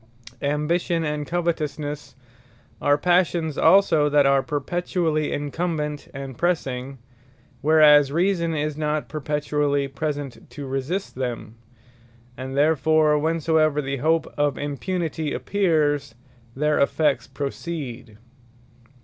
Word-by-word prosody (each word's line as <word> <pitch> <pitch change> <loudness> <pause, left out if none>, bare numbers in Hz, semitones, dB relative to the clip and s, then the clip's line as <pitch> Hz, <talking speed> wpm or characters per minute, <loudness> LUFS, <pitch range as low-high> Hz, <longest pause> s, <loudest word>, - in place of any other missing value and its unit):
Ambition, 165 +4 0
and 150 -1 -3
Covetousnesse 155 -4 -3 0.7
are 145 0 +3
Passions 170 -2 +1
also 160 -7 +4
that 145 -1 +4
are 135 0 +4
perpetually 155 +1 -1
incumbent, 150 0 -3
and 135 -1 -7
pressing; 135 -6 -1 0.6
whereas 150 -2 +6
Reason 170 0 +1
is 150 0 -2
not 150 0 -2
perpetually 150 -1 -1
present, 145 -1 -5
to 145 - -8
resist 135 +9 -3
them: 120 -4 -4 0.8
and 130 +1 -6
therefore 155 0 +3
whensoever 160 -1 +1
the 135 -1 -2
hope 160 +4 +1
of 145 -1 +1
impunity 155 +1 -3
appears, 150 - 0 0.4
their 150 +2 +1
effects 140 -3 +1
proceed. 135 -5 -6
150 Hz, 100 wpm, -23 LUFS, 140-160 Hz, 0.8 s, whereas